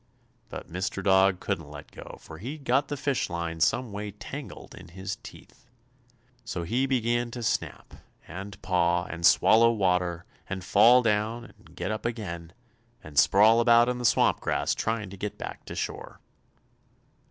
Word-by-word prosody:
But - - -8
Mr. 95 +2 -4
Dog 95 -1 +4
couldn't 85 -7 -4
let 75 -1 -11
go, - - -11
for 80 - -12
he'd 140 - -7
got 135 +3 +1
the 145 - -4
fish 140 -1 -1
line 85 -1 -4
some 115 +7 +1
way 105 +1 -5
tangled - - -9
in 95 - -12
his 95 +2 -6
teeth. 125 -1 -15 0.8
So 95 -7 -4
he 125 +10 0
began 120 -2 0
to 120 0 -7
snap 110 - -3 0.3
and 100 +3 -8
paw 90 -1 +1
and 85 +2 -8
swallow 115 +6 +6
water, 90 -5 0 0.2
and 95 -1 -4
fall 120 +7 +5
down 110 +2 0
and - - -20
get 105 - -3
up 110 - -4
again, 85 -8 -6 0.5
and 75 -1 0
sprawl 110 +4 +5
about 120 +1 +5
in 125 0 -2
the - - -5
swamp - - +3
grass, - - 0
trying 110 -4 -3
to 100 - -10
get 105 +2 -5
back - - -8
to - - -8
shore. - - -5
105 Hz, 165 wpm, -27 LUFS, 90-120 Hz, 0.8 s, swallow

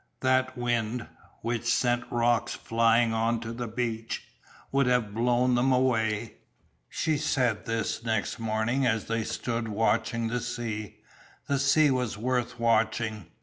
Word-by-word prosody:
That 130 0 +2
wind, 120 -1 -1 0.4
which 115 0 -2
sent 120 -1 +1
rocks 120 0 +1
flying 115 0 +2
on 115 +1 +1
to 115 0 -5
the 120 0 -4
beach, 115 -1 -3 0.5
would 135 -1 +2
have 125 -5 +1
blown 120 +2 +2
them 125 +2 +3
away. 115 -4 +1 0.5
She 155 -2 0
said 125 -7 0
this 115 0 -2
next 110 0 -1
morning 115 +4 0
as 115 -4 +1
they 115 0 -1
stood 115 +1 -3
watching 115 +2 0
the 125 +1 -1
sea. 115 -4 -5 0.4
The 140 -1 0
sea 140 +2 +4
was 125 -5 -1
worth 125 +1 -1
watching. 110 -3 +1
115 Hz, 140 wpm, -28 LUFS, 115-125 Hz, 0.5 s, sea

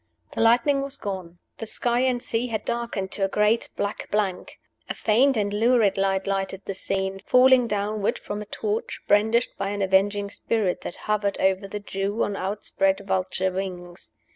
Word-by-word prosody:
The - - -2
lightning 245 +5 +4
was 275 0 -5
gone. 185 -6 -6 0.2
The 225 - -5
sky 240 +2 0
and 250 -1 +1
sea 235 0 -1
had 220 -3 -3
darkened 235 -5 -3
to 200 - -1
a - - +3
great 210 +3 +2
black 205 +1 -3
blank. 200 -3 -2 0.3
A - - -2
faint 250 +4 +3
and 205 -1 0
lurid 225 -2 +3
light 195 0 0
lighted 195 -1 -2
the 195 - -3
scene, 190 0 -1
falling 250 +3 +5
downward 205 0 -1
from 205 0 -6
a 210 - -8
torch, 215 +2 -3
brandished 220 +4 +3
by 195 - -1
an 200 0 -2
avenging 200 +1 +2
Spirit 210 -5 -1
that - - -6
hovered 210 -2 0
over 190 +1 +1
the 210 +1 -5
Jew 200 +2 -2
on 205 - -2
outspread 195 0 0
vulture 190 -1 0
wings. 180 -2 -6
205 Hz, 175 wpm, -25 LUFS, 195-225 Hz, 0.3 s, falling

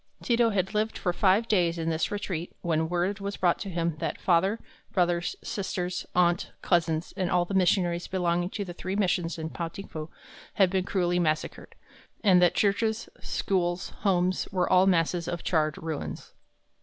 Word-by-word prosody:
Ti 235 - +2
to 235 -1 +4
had 190 -1 -1
lived 215 +1 0
for 180 - -1
five 200 +5 +3
days 175 -5 +2
in 165 0 -1
this 160 0 0
retreat 180 -4 -4
when 160 -2 0
word 180 +3 0
was 200 0 -4
brought 175 -2 +2
to 195 - -5
him 170 -3 -1
that - - -3
father, 190 +5 +2 0.3
brothers, 175 -1 +1
sisters, 185 -2 -3
aunt, 175 0 +2
cousins, 165 -1 +1
and 185 -3 -1
all 175 -1 +2
the 195 - -6
missionaries 175 -2 +2
belonging 175 -1 0
to 200 0 -4
the 175 - -7
three 185 +2 -4
missions 180 -4 0
in 160 0 -5
Pao 170 - -3
ting 195 +4 -9
fu, 155 0 -7 0.5
had 190 -3 +4
been 190 -1 0
cruelly 180 -2 +1
massacred, 155 -3 -2 0.5
and 185 -4 +6
that 175 0 +4
churches, 220 +2 +1
schools, 180 -1 -1
homes, 185 -2 +1
were 180 -2 +1
all 185 +1 +5
masses 170 -1 +1
of 175 -1 -4
charred 155 -3 +1
ruins. 160 -2 -5
180 Hz, 180 wpm, -27 LUFS, 170-195 Hz, 0.5 s, and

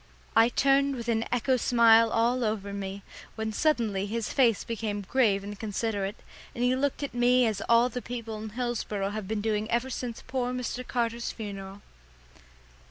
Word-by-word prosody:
I 225 +1 +6
turned 275 +2 +3
with 235 -2 -6
an 225 0 +1
echo 250 +2 +2
smile 230 -1 +5
all 240 +3 +1
over 210 -2 -2
me, 200 0 -5 0.3
when 220 0 -3
suddenly 215 -8 +1
his 225 +1 -3
face 235 -6 +3
became 215 -3 -3
grave 200 -2 +2
and 205 0 -7
considerate, 205 -2 -2 0.4
and 240 - -2
he 250 +1 +3
looked 280 +2 -1
at 280 - -4
me 245 +1 +4
as 215 -3 -1
all 235 +1 +6
the 250 0 -5
people 230 -3 -6
in 220 - -5
Hillsboro 215 -4 -2
have 210 -2 -5
been 215 0 -2
doing 215 0 -1
ever 240 +3 0
since 240 -2 -5
poor 250 -1 -2
Mr. 250 0 -4
Carter's 235 -1 -1
funeral. 200 -2 -8
230 Hz, 170 wpm, -28 LUFS, 210-245 Hz, 0.4 s, I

